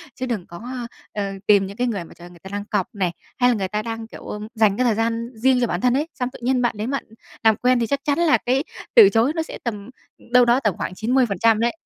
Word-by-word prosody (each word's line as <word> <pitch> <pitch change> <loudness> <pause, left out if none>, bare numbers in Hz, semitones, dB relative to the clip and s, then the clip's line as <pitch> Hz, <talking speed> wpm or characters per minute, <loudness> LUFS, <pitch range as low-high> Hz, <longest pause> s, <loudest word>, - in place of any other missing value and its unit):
chứ 255 - -4
đừng 225 -8 -3
có, 240 +7 -7 0.3
ờ, 205 - -2 0.2
tìm 200 -2 +5
những 200 +2 -10
cái 250 - 0
người 200 -7 -2
mà - - -14
trời 175 - -13
ơi - - -11
người 175 - -16
ta 190 - -11
đang 205 0 -3
cọc 210 -2 -1
này, 185 -4 0 0.3
hay 245 - +5
là 245 - +2
người 195 -3 -2
ta 210 +2 -2
đang 225 0 -5
kiểu, - - -12
ừm, 210 0 -6
dành 215 -2 +3
cái 255 - +2
thời 230 -3 +3
gian 230 +1 -1
riêng 250 +3 +2
cho 240 - +2
bản 175 -1 -2
thân 250 -1 +3
ấy, 295 +3 0
xong 250 -2 -2
tự - - -11
nhiên 255 0 +2
bạn 240 -2 +1
đến 220 +5 -3
bạn 275 - -2 0.4
làm 220 -1 +5
quen 250 0 +2
thì 230 - 0
chắc 280 - 0
chắn 290 +1 +1
là 335 -3 +4
cái 260 +3 0 0.3
từ 435 -5 +9
chối 235 +5 +2
nó 325 - 0
sẽ - - -9
tầm 210 -3 -5 0.4
đâu 250 -1 +7
đó 240 +2 +4
tầm 210 -8 -1
khoảng 185 - -4
90% 225 -2 +2
đấy. 235 +5 +1
230 Hz, 285 wpm, -22 LUFS, 210-250 Hz, 0.4 s, từ